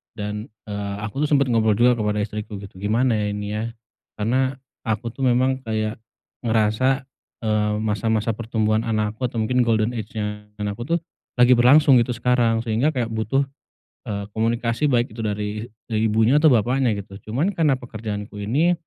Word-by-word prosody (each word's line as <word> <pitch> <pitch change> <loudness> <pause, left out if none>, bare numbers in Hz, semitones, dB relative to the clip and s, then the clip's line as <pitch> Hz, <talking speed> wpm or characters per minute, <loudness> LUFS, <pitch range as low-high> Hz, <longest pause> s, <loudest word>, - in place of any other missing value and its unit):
Dan, 105 +1 -4 0.2
eee, 100 -1 -3
aku 110 +7 -2
tuh - - -2
sempet 140 -2 +4
ngobrol 110 -2 +3
juga 120 +3 +4
kepada 105 -1 0
istriku 105 0 -5
gitu. 95 -2 -11
Gimana 115 +4 +2
ya 105 - 0
ini 105 0 -4
ya, 105 - -2 0.5
karena 130 +5 0 0.3
aku 110 +1 -1
tuh 135 - -6
memang 130 +2 +2
kayak 110 0 -2 0.5
ngerasa, 115 +4 +2 0.4
eee, 105 -1 +1
masa-masa 110 +1 0
pertumbuhan 110 -1 0
anakku 110 +1 -1
atau 120 - -7
mungkin 125 +3 +2
golden 110 0 +2
age-nya 105 -1 -5
anak 105 -1 -2
aku 160 +9 0
tuh - - -7 0.4
lagi 125 +1 +7
berlangsung 135 +4 +6
gitu 120 +1 +1
sekarang 120 -1 +2
sehingga 115 +7 +2
kayak 125 -6 -1
butuh, 110 +5 +1 0.7
eee, 100 -1 -3
komunikasi, 115 +4 0
baik 120 -2 +1
itu 115 - -6
dari 105 +1 -3 0.2
dari 110 -1 -1
ibunya 110 +6 +4
atau 160 - +6
bapaknya 125 0 +2
gitu. 100 -1 -8 0.2
Cuman 145 - +1
karena 155 -6 +3
pekerjaanku 105 -4 -6
ini, 145 +12 +2
110 Hz, 165 wpm, -23 LUFS, 105-125 Hz, 0.7 s, lagi